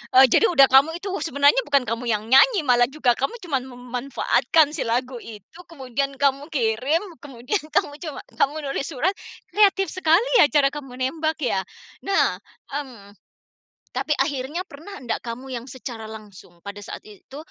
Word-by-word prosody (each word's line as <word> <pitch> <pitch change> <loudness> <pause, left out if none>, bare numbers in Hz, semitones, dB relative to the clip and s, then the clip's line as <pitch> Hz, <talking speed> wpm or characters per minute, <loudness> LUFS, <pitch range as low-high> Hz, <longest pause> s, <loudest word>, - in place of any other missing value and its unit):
eee, 265 +1 +9
jadi 450 - +5
udah 275 -6 +6
kamu 285 +5 +5
itu 390 +2 -6
sebenarnya 285 - +3
bukan 280 -3 +3
kamu 230 +2 -3
yang 215 -1 0
nyanyi 365 - +6
malah 245 -2 +4
juga 275 -4 +1
kamu 275 - -3
cuman 275 -7 -1
memanfaatkan 255 +5 0
si 305 - -4
lagu 250 +1 -1
itu 225 - -13
kemudian 275 -2 -3
kamu 280 +1 0
kirim 260 - 0 0.2
kemudian 275 - -4
kamu 290 - +2
cuma 310 -4 -6 0.2
kamu 285 +3 +2 0.2
nulis 275 - -3
surat 320 +5 0 0.4
kreatif 390 -2 +3
sekali 370 +5 +2
ya 295 - +7
cara 275 +1 +3
kamu 270 -4 -8
nembak 310 +5 -1
ya 195 -6 +1 0.5
nah, 390 - +2 0.3
mmm, 250 -8 -7 0.8
tapi 270 +4 -4
akhirnya 290 +6 -2
pernah 330 +7 -11
nggak 230 - -2
kamu 250 +2 -7
yang 240 0 -5
secara 235 -4 -8
langsung 205 -5 -12
pada 205 0 -7
saat - - -9
itu 215 +6 -13
270 Hz, 160 wpm, -23 LUFS, 245-310 Hz, 0.8 s, eee